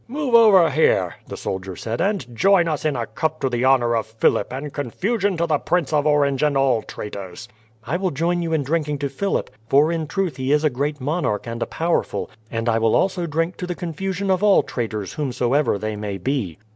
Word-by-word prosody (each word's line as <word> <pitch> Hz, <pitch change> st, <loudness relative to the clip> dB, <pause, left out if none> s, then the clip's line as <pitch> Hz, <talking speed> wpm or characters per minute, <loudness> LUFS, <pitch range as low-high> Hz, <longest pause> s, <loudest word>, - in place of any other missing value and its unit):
"Move 270 Hz, 0 st, -3 dB
over 200 Hz, -8 st, +7 dB
here," 100 Hz, -, +2 dB
the -, -, -7 dB
soldier 95 Hz, -1 st, -4 dB
said, 115 Hz, +5 st, -4 dB
"and 175 Hz, -, -1 dB
join 190 Hz, -, +4 dB
us 155 Hz, -2 st, -2 dB
in 150 Hz, -3 st, +1 dB
a 120 Hz, -2 st, -2 dB
cup 155 Hz, +9 st, -3 dB
to 135 Hz, -, 0 dB
the 120 Hz, 0 st, -1 dB
honour 125 Hz, -3 st, +3 dB
of 110 Hz, -1 st, -1 dB
Philip 110 Hz, 0 st, +1 dB
and 135 Hz, +2 st, -5 dB
confusion 190 Hz, -, -1 dB
to 170 Hz, -, +1 dB
the 155 Hz, -3 st, +1 dB
Prince 170 Hz, -5 st, 0 dB
of 150 Hz, 0 st, +2 dB
Orange 140 Hz, -3 st, +2 dB
and 150 Hz, -2 st, +2 dB
all 130 Hz, -4 st, +2 dB
traitors." 100 Hz, -5 st, -8 dB, 0.4 s
"I 145 Hz, +10 st, -2 dB
will 185 Hz, 0 st, 0 dB
join 170 Hz, +4 st, 0 dB
you 165 Hz, -1 st, -2 dB
in 155 Hz, -3 st, +1 dB
drinking 150 Hz, 0 st, -1 dB
to 140 Hz, 0 st, -2 dB
Philip, 195 Hz, +9 st, -2 dB, 0.2 s
for 145 Hz, +6 st, +4 dB
in 165 Hz, -2 st, -2 dB
truth 180 Hz, -5 st, -2 dB
he 130 Hz, +1 st, -1 dB
is 150 Hz, +1 st, +3 dB
a 155 Hz, -, +3 dB
great 145 Hz, +4 st, -2 dB
monarch 140 Hz, -6 st, -1 dB
and 115 Hz, 0 st, -5 dB
a -, -, -1 dB
powerful, 170 Hz, +1 st, -1 dB, 0.2 s
and 115 Hz, 0 st, -3 dB
I 115 Hz, -1 st, +2 dB
will 115 Hz, -1 st, +2 dB
also 185 Hz, -3 st, +1 dB
drink 165 Hz, +3 st, -1 dB
to 180 Hz, -, -5 dB
the 175 Hz, -, -3 dB
confusion 190 Hz, +3 st, -3 dB
of 185 Hz, -, +1 dB
all 205 Hz, -2 st, +5 dB
traitors 110 Hz, -5 st, -4 dB
whomsoever 135 Hz, -2 st, 0 dB
they 110 Hz, +1 st, -3 dB
may 105 Hz, -1 st, -4 dB
be." 100 Hz, -, -2 dB
145 Hz, 220 wpm, -22 LUFS, 120-170 Hz, 0.4 s, over